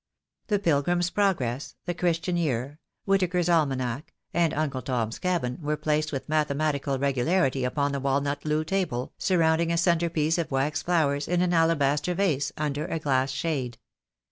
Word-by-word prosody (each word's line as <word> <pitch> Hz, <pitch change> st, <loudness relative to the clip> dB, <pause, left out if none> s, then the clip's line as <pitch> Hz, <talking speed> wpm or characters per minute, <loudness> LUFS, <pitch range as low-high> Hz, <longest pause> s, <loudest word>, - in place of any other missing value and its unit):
"The 210 Hz, -, +2 dB
Pilgrim's 175 Hz, 0 st, +1 dB
Progress," 160 Hz, -, 0 dB
"The 175 Hz, -, -1 dB
Christian 175 Hz, 0 st, 0 dB
Year," 145 Hz, -3 st, -1 dB, 0.3 s
"Whittaker's 185 Hz, -3 st, +1 dB
Almanack," 135 Hz, -5 st, 0 dB, 0.2 s
and 170 Hz, -2 st, +2 dB
"Uncle 145 Hz, -4 st, -2 dB
Tom's 115 Hz, -3 st, -2 dB
Cabin," 170 Hz, -9 st, -1 dB
were 150 Hz, 0 st, -1 dB
placed 155 Hz, 0 st, 0 dB
with 135 Hz, -3 st, -4 dB
mathematical 150 Hz, -2 st, 0 dB
regularity 135 Hz, +1 st, +1 dB
upon 140 Hz, +3 st, 0 dB
the 140 Hz, -, -2 dB
walnut 140 Hz, +1 st, -1 dB
loo 155 Hz, 0 st, 0 dB
table, 160 Hz, -8 st, -2 dB
surrounding 165 Hz, -2 st, +2 dB
a 170 Hz, -, +1 dB
centrepiece 165 Hz, -2 st, +1 dB
of 165 Hz, -, -2 dB
wax 135 Hz, +2 st, 0 dB
flowers 145 Hz, -5 st, +1 dB
in 180 Hz, +1 st, +2 dB
an 180 Hz, -1 st, +1 dB
alabaster 165 Hz, 0 st, +2 dB
vase 150 Hz, -7 st, +1 dB
under 150 Hz, -1 st, -2 dB
a -, -, -2 dB
glass 135 Hz, -3 st, +1 dB
shade. 130 Hz, -4 st, -2 dB
150 Hz, 150 wpm, -26 LUFS, 140-170 Hz, 0.3 s, The